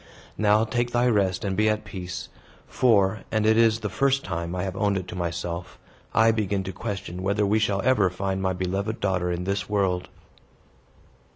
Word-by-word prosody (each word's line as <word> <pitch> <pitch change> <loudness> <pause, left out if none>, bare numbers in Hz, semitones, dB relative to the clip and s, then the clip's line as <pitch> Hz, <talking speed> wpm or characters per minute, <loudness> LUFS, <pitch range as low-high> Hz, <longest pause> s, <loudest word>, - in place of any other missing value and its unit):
Now, 105 +1 +4
take 120 +1 -1
thy 120 +1 +3
rest, 100 -4 +1
and 95 -1 -1
be 110 +2 +3
at 105 0 -1
peace. 90 -2 -6 0.4
For 105 -5 +3
and 110 -1 +1
it 110 0 +5
is 115 -1 +4
the 105 - -2
first 135 +5 +1
time 85 -1 -4
I 90 - -2
have 95 -1 -4
owned 100 0 +1
it 90 -1 -5
to - - -6
myself 85 0 -4 0.3
I 115 0 +5
begin 100 -3 -1
to 95 0 -6
question 95 -3 -5
whether 100 +2 +1
we 105 +2 +2
shall 100 -2 0
ever 110 -8 +3
find 95 +1 -3
my 95 -1 0
beloved 95 +4 -2
daughter 90 -3 0
in 90 0 -2
this 100 +3 -2
world." 95 -3 0
100 Hz, 190 wpm, -25 LUFS, 90-110 Hz, 0.4 s, it